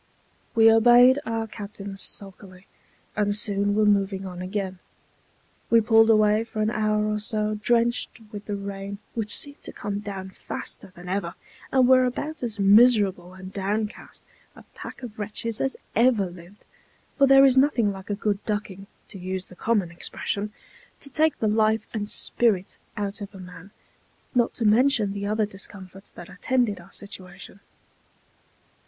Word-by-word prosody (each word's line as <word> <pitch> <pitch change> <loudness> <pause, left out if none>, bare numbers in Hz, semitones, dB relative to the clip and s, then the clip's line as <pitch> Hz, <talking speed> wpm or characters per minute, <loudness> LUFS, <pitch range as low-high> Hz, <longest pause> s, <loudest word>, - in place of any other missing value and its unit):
We 225 -1 +7
obeyed 240 +4 +6
our 225 0 -1
captain 200 -2 -8
sulkily, 195 -1 -7 0.5
and 205 -1 +1
soon 205 -1 0
were 215 0 +3
moving 195 -1 +1
on 180 -1 -7
again. 190 0 -4 0.9
We 230 - +6
pulled 225 0 +5
away 215 0 +4
for 230 -1 -7
an 215 - +1
hour 215 -1 +1
or 210 0 -1
so, 215 0 -1
drenched 240 +2 +1
with 205 -1 -8
the 205 - -3
rain, 200 0 -6 0.2
which 215 -3 +2
seemed 285 0 -2
to - - -8
come 205 0 -4
down 195 -2 -6
faster - - -5
than 180 -1 -13
ever, 180 -2 -2 0.4
and 260 -2 +4
were 255 0 +6
about 295 +5 -4
as 230 -3 -3
miserable 200 -4 +4
and 190 0 -10
down 205 +2 -1
cast 210 - -14 0.3
a - - -14
pack - - -10
of 220 -3 -8
wretches 215 +2 -4
as 270 - -1 0.2
ever 225 -6 +3
lived; 175 +3 -15 0.5
for 275 - +6
there 270 0 +8
is 260 -2 +5
nothing 260 -6 +3
like 190 0 -10
a 205 - 0
good 205 -1 -2
ducking 200 -2 -4 0.2
(to 195 - -10
use 185 +1 -4
the 180 - -13
common 205 -4 0
expression) 200 +4 -3 0.5
to 280 - -9
take 310 +4 +2
the 220 - 0
life 215 0 +2
and 210 -2 -3
spirit 210 -6 0 0.2
out 205 +1 -3
of 200 0 -8
a - - -10
man, 180 0 -11 0.6
not 240 -3 +1
to 230 - -2
mention 220 -2 +3
the 200 0 -4
other 215 +1 +1
discomforts 195 -1 -9
that 175 - -11
attended 240 -7 -1
our 175 - -16
situation. 195 -1 -9
210 Hz, 165 wpm, -25 LUFS, 195-225 Hz, 0.9 s, there